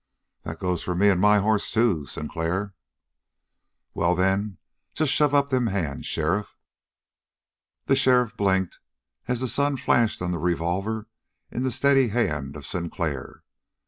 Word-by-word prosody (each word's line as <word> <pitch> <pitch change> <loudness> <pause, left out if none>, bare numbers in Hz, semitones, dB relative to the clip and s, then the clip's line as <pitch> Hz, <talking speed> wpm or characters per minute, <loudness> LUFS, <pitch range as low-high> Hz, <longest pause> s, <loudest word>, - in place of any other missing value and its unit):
"That 80 0 -7
goes 90 -1 -1
for 90 - -3
me 100 +3 +4
and 95 -2 +2
my 105 +1 +5
hoss, 105 +1 +1
too, 100 -11 +1
Sinclair." 85 +8 -3 1.2
"Well, 85 +1 +1
then, 95 +2 0 0.4
just 155 -3 +1
shove 145 -1 +3
up 140 0 +3
them 130 -3 +1
hands, 90 -9 -3
sheriff!" 85 +7 -1 1.3
The 135 - +3
sheriff 125 -3 +3
blinked, 95 -3 0 0.5
as 125 -1 -1
the 130 - 0
sun 140 +4 0
flashed 120 -3 +2
on 90 0 -2
the 85 - -2
revolver 90 +6 -1 0.4
in 125 - -3
the 130 - 0
steady 135 +1 +3
hand 75 - -1
of 75 -3 -9
Sinclair. 85 -5 -4
100 Hz, 145 wpm, -25 LUFS, 85-125 Hz, 1.3 s, my